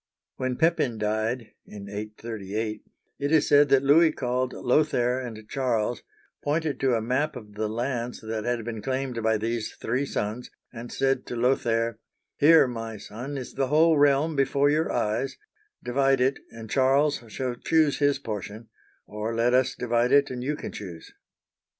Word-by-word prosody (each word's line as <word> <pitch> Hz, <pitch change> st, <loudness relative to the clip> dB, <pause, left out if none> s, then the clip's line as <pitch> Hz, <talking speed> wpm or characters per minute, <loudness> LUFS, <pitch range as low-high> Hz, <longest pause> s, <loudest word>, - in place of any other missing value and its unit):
When 130 Hz, -1 st, -1 dB
Pepin 150 Hz, -7 st, +1 dB
died 110 Hz, +3 st, -2 dB, 0.2 s
(in 100 Hz, -1 st, -9 dB
838), 105 Hz, 0 st, -5 dB, 0.4 s
it 145 Hz, +1 st, -1 dB
is 160 Hz, -2 st, +4 dB
said 145 Hz, 0 st, +5 dB
that 135 Hz, 0 st, +4 dB
Louis 155 Hz, +4 st, +5 dB
called 125 Hz, -2 st, -1 dB
Lothair 125 Hz, -2 st, +1 dB
and 110 Hz, -4 st, -8 dB
Charles, 120 Hz, -3 st, -1 dB, 0.4 s
pointed 150 Hz, 0 st, -1 dB
to 130 Hz, -3 st, +2 dB
a 115 Hz, -, 0 dB
map 135 Hz, +6 st, 0 dB
of 105 Hz, -4 st, -10 dB
the 105 Hz, +1 st, -2 dB
lands 120 Hz, +1 st, -3 dB
that 110 Hz, -1 st, -4 dB
had 120 Hz, -1 st, -2 dB
been 115 Hz, -2 st, -5 dB
claimed 130 Hz, 0 st, -2 dB
by 110 Hz, 0 st, +2 dB
these 115 Hz, +1 st, -3 dB
three 130 Hz, +5 st, -2 dB
sons, 110 Hz, +3 st, -3 dB, 0.2 s
and 120 Hz, 0 st, -8 dB
said 135 Hz, -1 st, 0 dB
to -, -, -4 dB
Lo 125 Hz, +3 st, +3 dB
thair: 115 Hz, -2 st, -1 dB, 0.2 s
" -, -, -56 dB
Here, 155 Hz, -1 st, +6 dB
rny 115 Hz, -3 st, -6 dB
son, 125 Hz, +9 st, -7 dB
is 130 Hz, -, -7 dB
the 135 Hz, -1 st, 0 dB
whole 160 Hz, +3 st, +4 dB
realm 145 Hz, +2 st, +3 dB
before 140 Hz, +1 st, +2 dB
your 155 Hz, +2 st, +1 dB
eyes; 120 Hz, +3 st, -1 dB, 0.5 s
divide 135 Hz, +2 st, +2 dB
it, 130 Hz, +2 st, +1 dB
and 115 Hz, -1 st, -10 dB
Charles 135 Hz, +3 st, +2 dB
shall 125 Hz, +3 st, -3 dB
choose 155 Hz, +4 st, +1 dB
his 145 Hz, -1 st, +3 dB
portion; 110 Hz, -2 st, -6 dB, 0.4 s
or 105 Hz, +2 st, -4 dB
let 120 Hz, +2 st, +2 dB
us 130 Hz, 0 st, +2 dB
divide 120 Hz, 0 st, +1 dB
it, 140 Hz, -1 st, +4 dB
and 125 Hz, -1 st, -5 dB
you 150 Hz, +3 st, -1 dB
can -, -, -7 dB
choose." 85 Hz, -5 st, -9 dB
125 Hz, 170 wpm, -26 LUFS, 110-140 Hz, 0.5 s, Here